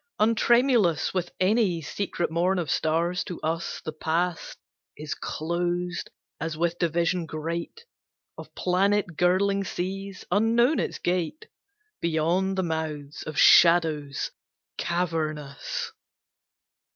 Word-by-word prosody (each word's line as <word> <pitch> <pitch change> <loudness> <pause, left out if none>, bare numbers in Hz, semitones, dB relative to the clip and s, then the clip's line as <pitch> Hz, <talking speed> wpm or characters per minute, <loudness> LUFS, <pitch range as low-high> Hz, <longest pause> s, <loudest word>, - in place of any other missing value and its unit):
Untremulous 230 - +3
With 180 -2 -2
any 190 -2 +2
secret 175 +1 -3
morn 180 +3 +1
of 170 -4 -1
stars, 170 +3 +1
to 175 - -6
us 165 +2 -2
The 155 - -2
Past 165 +2 -2 0.4
is 150 0 -4
closed 175 +2 -2 0.3
as 160 -1 -3
with 170 +1 0
division 170 +1 0
great 170 - -5 0.5
Of - - -11
planet 190 0 +1
girdling 195 +4 +2
seas 195 +2 -5
unknown 230 - +3
its - - -2
gate, 180 - -2 0.6
Beyond 170 +4 +1
the 190 - +1
mouths 155 -3 -4
of 155 - -5
shadows 160 -5 +5 0.5
cavernous. 155 -6 -2
175 Hz, 105 wpm, -26 LUFS, 160-190 Hz, 0.6 s, shadows